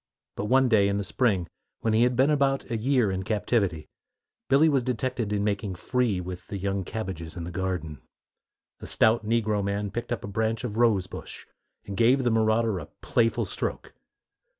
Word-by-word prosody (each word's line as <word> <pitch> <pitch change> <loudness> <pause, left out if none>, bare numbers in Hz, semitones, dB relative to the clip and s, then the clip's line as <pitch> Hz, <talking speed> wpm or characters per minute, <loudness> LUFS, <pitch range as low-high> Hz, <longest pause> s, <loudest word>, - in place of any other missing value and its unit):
But 100 - -3
one 130 +4 +4
day, 105 -4 +4
in 100 0 0
the 100 - -1
spring, 100 -4 +1 0.4
when 110 - +1
he 110 - +4
had 125 +1 +3
been 135 +4 +4
about 135 -3 +1
a - - 0
year 120 -2 +2
in 95 0 -2
captivity, 100 -6 0 0.6
Billy 140 +4 +5
was 140 -4 +3
detected 125 -2 -2
in 100 -1 0
making 100 -2 -1
free 120 0 0
with 90 0 -7
the 100 - -5
young 100 0 -2
cabbages 90 -6 -6
in 85 - -4
the 85 - -6
garden. 90 -5 -3 0.8
A - - -8
stout 110 +1 +3
negro 110 -2 +1
man 100 0 -2
picked 120 +3 -5
up 120 - -2
a - - -5
branch 110 +3 -1
of 110 -3 -4
rose 110 -6 +3
bush, - - -9 0.4
and 100 - -6
gave 125 +6 +4
the 120 - +2
marauder 110 -2 +2
a 75 - -8
playful 115 0 +1
stroke. - - -4
110 Hz, 190 wpm, -26 LUFS, 95-120 Hz, 0.8 s, Billy